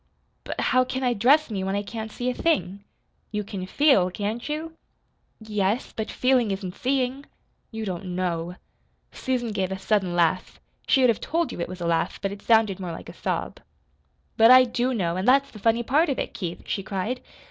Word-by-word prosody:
"But -, -, -5 dB
how 255 Hz, 0 st, +3 dB
can 260 Hz, +1 st, -4 dB
I 250 Hz, -1 st, +2 dB
dress 260 Hz, +6 st, +3 dB
me 195 Hz, -3 st, -2 dB
when 195 Hz, +1 st, -1 dB
I 205 Hz, -, -1 dB
can't 220 Hz, +1 st, -6 dB
see 245 Hz, -, -4 dB
a -, -, -4 dB
thing?" 200 Hz, -, 0 dB, 0.5 s
"You 210 Hz, -1 st, -2 dB
can 190 Hz, -2 st, -6 dB
feel, 270 Hz, -8 st, +4 dB
can't 215 Hz, +7 st, -4 dB
you?" 315 Hz, +2 st, -4 dB, 0.7 s
"Y -, -, -12 dB
yes. 210 Hz, +2 st, 0 dB
But 220 Hz, -1 st, -3 dB
feeling 255 Hz, -3 st, +2 dB
isn't 190 Hz, -2 st, -4 dB
seeing. 265 Hz, +2 st, -1 dB, 0.4 s
You 220 Hz, -1 st, -5 dB
don't 180 Hz, -1 st, -4 dB
KNOW." 175 Hz, -1 st, -2 dB, 0.6 s
Susan 245 Hz, -3 st, -2 dB
gave 190 Hz, -2 st, -2 dB
a 190 Hz, -, -2 dB
sudden 190 Hz, -2 st, 0 dB
laugh 175 Hz, +1 st, +1 dB, 0.3 s
she 270 Hz, -, +4 dB
would 250 Hz, -2 st, +6 dB
have 220 Hz, -, -5 dB
told 335 Hz, 0 st, -1 dB
you -, -, -7 dB
it -, -, -3 dB
was 185 Hz, -1 st, -8 dB
a -, -, -2 dB
laugh 170 Hz, +2 st, 0 dB
but 195 Hz, -, -2 dB
it 200 Hz, -, -8 dB
sounded 220 Hz, -4 st, +3 dB
more 180 Hz, -2 st, -4 dB
like -, -, -9 dB
a -, -, -9 dB
sob. -, -, -3 dB, 0.8 s
"But 225 Hz, +1 st, +7 dB
I 255 Hz, 0 st, +9 dB
do 245 Hz, +1 st, -1 dB
know, 180 Hz, -7 st, -1 dB
an' 185 Hz, -, -2 dB
that's 275 Hz, +2 st, +4 dB
the 215 Hz, -, -11 dB
funny 230 Hz, +3 st, +2 dB
part 300 Hz, +7 st, +2 dB
of 275 Hz, -, -1 dB
it, -, -, -3 dB
Keith," 175 Hz, -2 st, -5 dB
she 195 Hz, -, -2 dB
cried. 200 Hz, +6 st, -3 dB
215 Hz, 210 wpm, -25 LUFS, 190-255 Hz, 0.8 s, I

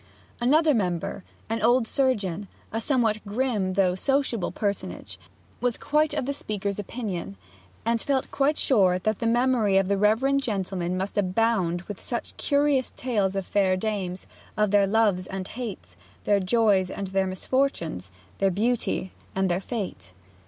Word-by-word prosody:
Another 300 Hz, +6 st, +4 dB
member, 185 Hz, -3 st, -1 dB, 0.2 s
an 225 Hz, +1 st, -2 dB
old 240 Hz, +1 st, +4 dB
surgeon, 205 Hz, -9 st, 0 dB, 0.2 s
a 225 Hz, -, -2 dB
somewhat 225 Hz, -5 st, +1 dB
grim 210 Hz, -3 st, -1 dB
though 185 Hz, -1 st, +3 dB
sociable 255 Hz, 0 st, 0 dB
personage, 200 Hz, -2 st, -4 dB, 0.4 s
was 245 Hz, -2 st, 0 dB
quite 300 Hz, +1 st, +1 dB
of -, -, -1 dB
the 280 Hz, -, -1 dB
speaker's 205 Hz, -6 st, -3 dB
opinion, 195 Hz, -, -5 dB, 0.5 s
and 230 Hz, 0 st, +1 dB
felt 270 Hz, -2 st, -1 dB
quite 285 Hz, +2 st, +2 dB
sure 190 Hz, -8 st, +3 dB
that 215 Hz, +3 st, -1 dB
the 230 Hz, -, 0 dB
memory 235 Hz, -4 st, +3 dB
of 195 Hz, 0 st, +2 dB
the 200 Hz, -1 st, +1 dB
reverend 255 Hz, +7 st, +3 dB
gentleman 190 Hz, -6 st, -2 dB
must 195 Hz, +2 st, -2 dB
abound 185 Hz, -3 st, +1 dB
with 205 Hz, 0 st, -8 dB
such 240 Hz, -, -4 dB
curious 285 Hz, -2 st, +2 dB
tales 205 Hz, -6 st, 0 dB
of 195 Hz, -1 st, -2 dB
fair 190 Hz, -2 st, +2 dB
dames, 190 Hz, -3 st, -3 dB, 0.3 s
of 210 Hz, -2 st, +2 dB
their 200 Hz, -1 st, +4 dB
loves 200 Hz, -4 st, +2 dB
and 190 Hz, -1 st, -5 dB
hates, 205 Hz, -, -7 dB, 0.3 s
their 205 Hz, -1 st, +3 dB
joys 195 Hz, -1 st, +3 dB
and 195 Hz, 0 st, -5 dB
their 190 Hz, 0 st, +1 dB
misfortunes, 185 Hz, -, -1 dB, 0.3 s
their 195 Hz, -, +3 dB
beauty 210 Hz, -1 st, 0 dB, 0.2 s
and 190 Hz, -1 st, +1 dB
their 175 Hz, +2 st, 0 dB
fate. 200 Hz, -, -5 dB
205 Hz, 150 wpm, -26 LUFS, 190-240 Hz, 0.5 s, Another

